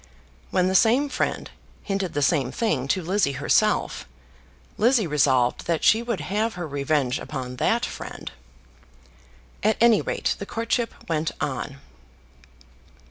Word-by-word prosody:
When 185 -1 +2
the 190 - 0
same 240 +9 +4
friend 255 - -2 0.3
hinted 195 -4 -2
the 145 - +1
same 145 -4 +2
thing 155 - -1
to 185 +5 0
Lizzie 180 -4 +1
herself, - - +1 0.7
Lizzie 235 -1 +3
resolved 130 -5 +2
that 165 -2 0
she 220 - +5
would 235 -8 -3
have 210 +7 -1
her 175 -2 -4
revenge 140 -2 0
upon 125 -3 -6
that - - +1
friend. - - -7 1.3
At 215 +1 +2
any 230 -2 +5
rate - - -1
the 200 - -6
courtship 230 +1 -1
went 160 -1 0
on. 135 +1 -3
180 Hz, 135 wpm, -24 LUFS, 140-220 Hz, 1.3 s, she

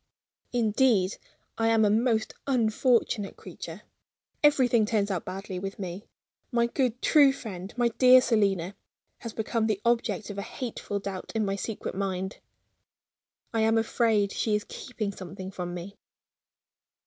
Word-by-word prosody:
Indeed, 220 -4 +2 0.4
I 225 - +2
am 225 -1 +4
a 205 - +3
most 225 0 +1
unfortunate 230 -4 +1
creature; 175 0 -9 0.6
everything 255 -6 +4
turns 210 -2 0
out 180 -4 -2
badly 190 -1 -5
with 195 +1 -5
me. 185 +1 -6 0.4
My 235 -1 +3
good, 245 0 0
true 285 -3 +6
friend, 200 -8 -7
my 240 -1 +3
dear 255 +2 +7
Selina, 200 -7 +1 0.5
has 230 - -6
become 220 0 -1
the 215 -3 0
object 235 -2 0
of 200 - -6
a - - -1
hateful 225 -2 -5
doubt 195 -2 -5
in 220 -1 +1
my 195 0 -1
secret 210 +2 -4
mind. 190 0 -3 1.1
I 225 - +1
am 225 +1 +3
afraid 225 -3 +2
she 215 -2 0
is 210 - -2
keeping 220 -5 -5
something 190 0 -8
from 175 -1 -5
me. 180 +3 -7
215 Hz, 145 wpm, -27 LUFS, 195-235 Hz, 1.1 s, dear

